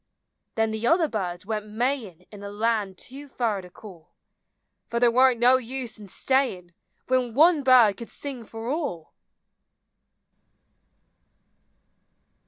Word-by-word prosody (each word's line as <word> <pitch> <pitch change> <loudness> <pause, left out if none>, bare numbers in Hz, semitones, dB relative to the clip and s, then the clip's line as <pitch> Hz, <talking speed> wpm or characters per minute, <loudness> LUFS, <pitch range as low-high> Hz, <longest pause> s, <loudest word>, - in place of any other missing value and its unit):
Then 225 -1 +1
the 220 +2 -2
other 330 -1 +4
birds 185 -8 -4
went 215 0 -3
May 240 +3 -1
in' 180 +1 -23
In 205 -1 -11
a 200 - -6
land 210 -2 -1
too 280 +3 -9
fur 230 -6 -2
to 180 - -13
call; 175 -4 -14 0.8
Fer 235 - -2
there 240 -1 +4
warn't 255 0 +4
no 250 +2 +6
use 255 -2 -5
in 205 - -11
stayin' 190 -7 -1 0.3
When 250 -3 0
one 320 +2 +5
bird 250 -6 +5
could 235 - -9
sing 270 -5 -7
fer 225 +1 -8
all 280 - -4
230 Hz, 135 wpm, -25 LUFS, 205-260 Hz, 0.8 s, no